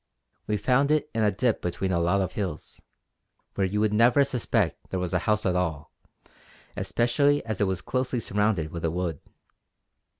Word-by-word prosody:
We 105 - 0
found 135 +5 +2
it 150 0 +1
in 115 - 0
a 105 - +4
dip 115 +3 0
between 90 +2 -2
a 85 - +1
lot 90 +4 +2
of 95 - -2
hills 100 -4 -5 0.7
where 95 -1 0
you 105 +3 -1
would 105 -1 +2
never 120 +5 +5
suspect 115 -8 -1
there 95 - -2
was 90 0 -3
a 90 - +3
house 105 0 +1
at 90 -2 +1
all, 80 -5 -2 0.8
especially 140 +4 +1
as 110 -3 -3
it 100 - +3
was 95 -1 -1
closely 130 -1 -1
surrounded 105 -7 0
with 85 - -6
a 80 - +1
wood. 85 -2 -3
105 Hz, 180 wpm, -26 LUFS, 90-120 Hz, 0.8 s, never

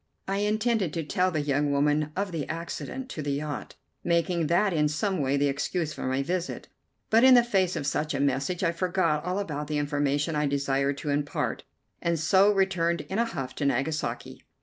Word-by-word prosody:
I 195 +1 -1
had 210 +1 +1
intended 215 -7 0
to 165 - -2
tell 180 +5 +1
the 155 -4 -1
young 145 0 +1
woman 150 +1 +1
of 195 0 -2
the 160 -4 -4
accident 170 +10 -5
to 155 - -5
the 145 -1 -2
yacht, 145 +1 -4 0.3
making 170 -1 +1
that 185 +4 +2
in 150 -2 +2
some 165 +5 -1
way 135 +1 +1
the 145 - +2
excuse 150 +3 -2
for - - -4
my 130 +1 0
visit; 180 +4 -3 0.4
but 225 +2 +5
in 260 -1 +8
the 240 - +7
face 190 -6 +1
of - - -3
such 150 +1 -1
a - - -1
message 140 +6 0
I 170 - +3
forgot 170 -3 0
all 180 +2 -2
about 150 -7 -3
the 150 0 -1
information 145 +1 0
I 150 0 +1
desired 140 0 0
to 145 - -3
impart, 145 0 -2 0.4
and 170 -1 0
so 190 +6 +5
returned 185 -4 +1
in 195 - -1
a 235 - +3
huff 135 - -5
to 145 - -1
Nagasaki. 140 +4 -2
160 Hz, 205 wpm, -27 LUFS, 145-185 Hz, 0.4 s, in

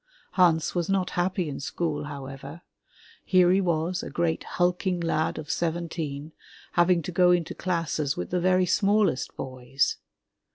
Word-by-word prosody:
Hans 165 -4 +3
was 175 -1 -1
not 190 -2 +1
happy 180 0 0
in 140 - -5
school, 150 0 -2
however. 140 +3 -8 0.6
Here 180 -2 +4
he 190 +2 +4
was, 175 0 0
a - - -6
great 170 -2 -1
hulking 180 +1 0
lad 165 -2 0
of 150 -1 -4
seventeen, 160 -3 -3 0.4
having 175 -1 +3
to 180 - -5
go 180 +1 +4
into 175 -2 +2
classes 165 -5 -1
with 90 - -4
the 180 - +1
very 185 +1 +3
smallest 195 -5 +1
boys. 130 0 -1
170 Hz, 150 wpm, -26 LUFS, 150-180 Hz, 0.6 s, Here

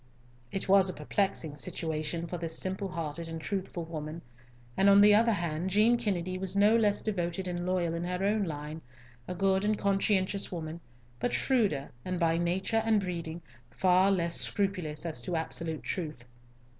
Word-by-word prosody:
It 195 - -3
was 195 -1 +5
a 185 - -5
perplexing 160 -1 -1
situation 160 0 -3
for 175 0 -5
this 165 -1 -1
simple 190 +1 -1
hearted 165 -2 -5
and 165 0 -5
truthful 185 -1 -4
woman, 160 0 -6 0.5
and, 195 +1 +4
on 200 0 +7
the 210 0 +8
other 230 +2 +5
hand, 170 -1 -2
Jean 215 +5 +4
Kennedy 185 -6 -2
was 190 0 -2
no 205 +3 +5
less 210 -3 +2
devoted 185 -3 -2
and 175 0 -3
loyal 180 -3 0
in 170 +1 -3
her 180 +2 -2
own 210 0 +2
line, 150 0 -6 0.5
a 180 - -4
good 190 +1 +2
and 210 0 +1
conscientious 195 0 +1
woman, 165 -2 -5 0.4
but 245 - -1
shrewder, 205 - +1
and, 185 -1 -3
by 165 -1 +2
nature 190 +6 0
and 225 -2 +3
breeding, 170 -3 -5 0.3
far 185 +9 +3
less 170 -3 +1
scrupulous 180 -7 -1
as 155 -7 -2
to 175 +8 -3
absolute 160 -1 -2
truth. 155 -10 -4
180 Hz, 170 wpm, -30 LUFS, 165-195 Hz, 0.5 s, the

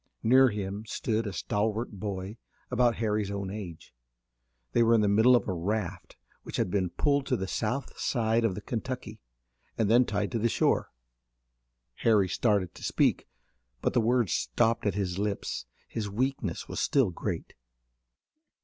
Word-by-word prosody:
Near 130 +3 +6
him 100 0 -4
stood 110 0 -1
a - - -3
stalwart 105 +4 -1
boy 100 0 -5 0.3
about 120 -2 +3
Harry's 105 -2 -1
own 100 -1 -4
age. 90 - -8 0.8
They - - +3
were 115 0 +5
in 110 - +4
the 105 - +2
middle 110 +5 +6
of 120 - +1
a 95 - 0
raft 90 0 -3 0.2
which - - -6
had 90 - 0
been 95 -2 +1
pulled 140 - +1
to 125 - +1
the 95 - -3
south 120 +7 -3
side 115 -1 +1
of 110 -5 +1
the 105 - -6
Kentucky 115 -2 -5 0.6
and 110 -1 +2
then 125 +2 +6
tied 100 -2 -1
to 115 - -1
the 115 +2 +2
shore. - - +1 1.1
Harry 105 -4 +3
started 100 -2 +1
to - - -12
speak, - - +1 0.5
but - - 0
the 120 - +3
words 115 -4 +2
stopped 105 - +1
at 100 - 0
his 95 -2 -2
lips. 100 -12 -3 0.2
His 105 -3 -4
weakness 115 -4 -2
was - - -4
still 130 -9 +2
great. - - -4
105 Hz, 165 wpm, -29 LUFS, 100-115 Hz, 1.1 s, Near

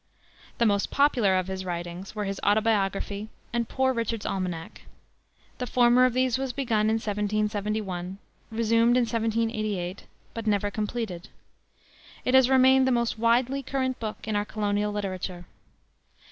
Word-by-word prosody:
The 235 - +2
most 200 -2 +2
popular 245 -10 +3
of 185 - 0
his 190 0 -4
writings 175 +2 -5
were 210 -1 -2
his 195 0 -3
Autobiography 205 -1 +1 0.2
and 235 -1 -1
Poor 260 0 +1
Richard's 230 -2 -2
Almanac. 180 -4 -4 0.8
The 250 - -3
former 245 +1 +5
of 255 - +1
these 255 0 +1
was 265 -2 -2
begun 225 -6 +1
in 220 - +2
1771, 210 -3 -2 0.3
resumed 230 +1 +3
in - - +4
1788, 220 -5 -2 0.3
but 225 -1 -5
never 205 -1 +1
completed. 210 -3 -4 1.0
It 255 - +1
has 260 -1 +6
remained 265 0 +5
the - - +3
most 235 -2 0
widely 245 +4 +2
current 260 -1 -2
book 215 -1 -6
in 215 - -1
our 205 - +1
colonial 210 -1 -1
literature. 185 -3 -4
215 Hz, 145 wpm, -26 LUFS, 200-240 Hz, 1.0 s, has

